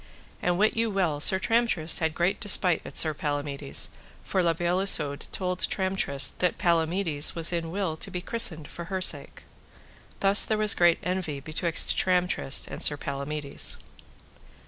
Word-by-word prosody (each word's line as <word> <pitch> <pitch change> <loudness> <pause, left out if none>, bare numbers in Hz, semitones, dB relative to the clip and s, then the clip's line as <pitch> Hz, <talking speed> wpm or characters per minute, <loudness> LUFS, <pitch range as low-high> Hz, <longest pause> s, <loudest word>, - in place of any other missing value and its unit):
And 175 0 0
wit 215 +3 +1
you 230 0 0
well 180 -7 -1
Sir 190 +5 +7
Tramtrist 210 -5 0
had 160 -1 -2
great 175 +3 0
despite 185 -4 +3
at - - -7
Sir 155 -1 +3
Palamides, 145 - -4 0.3
for 190 - -1
La 170 -1 +2
Beale 175 +2 -1
Isoud 150 -7 +1
told 180 -1 -3
Tramtrist 190 -10 0
that 180 - 0
Palamides 170 -3 0
was 165 +1 0
in 165 -1 -3
will 185 -2 -3
to - - -7
be 180 - -5
christened 175 -7 -1
for 170 - -9
her 190 +2 -4
sake. 145 -6 0 0.8
Thus 195 +1 +5
was 215 -1 +4
there - - -9
great 175 -1 +4
envy 180 -5 -3
betwixt 160 +3 0
Tramtrist 180 -6 +1
and - - -8
Sir 145 - +4
Palamides. 140 +1 -4
170 Hz, 160 wpm, -26 LUFS, 150-190 Hz, 0.8 s, Sir